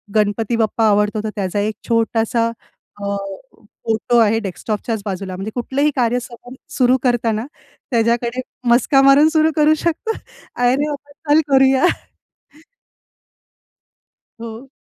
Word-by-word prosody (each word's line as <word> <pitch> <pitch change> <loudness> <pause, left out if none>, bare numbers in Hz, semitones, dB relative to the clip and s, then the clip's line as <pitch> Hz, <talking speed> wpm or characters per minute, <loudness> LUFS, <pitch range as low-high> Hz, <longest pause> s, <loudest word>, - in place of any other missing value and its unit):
गणपती 215 +2 +1
बाप्पा 225 0 +1
आवडतो 210 +1 +1
तर 220 - -2
त्याचा 200 0 -2
एक 215 +1 -1
छोटासा 230 0 +1 0.5
अ, 200 0 -2 0.7
फोटो 225 +2 +1
आहे 225 0 +3
डेस्कटॉपच्याच 215 +2 -4
बाजूला, 190 -2 -4
म्हणजे 195 +4 -5
कुठलंही 270 +4 0
कार्य 245 -1 +1 0.6
सुरु 255 0 +4
करताना 235 -2 0 0.5
त्याच्याकडे 235 +1 0 0.3
मस्का 260 +3 +4
मारून 275 +3 +6
सुरू 315 0 +2
करू 305 0 +4
शकतो. 335 +8 -1 0.4
"अरे 245 +1 +2
बाबा 290 -1 -7 0.2
चल 315 - +5
करूया." 270 +2 +4 2.6
हो. 230 +3 -9
235 Hz, 115 wpm, -19 LUFS, 215-265 Hz, 2.6 s, मारून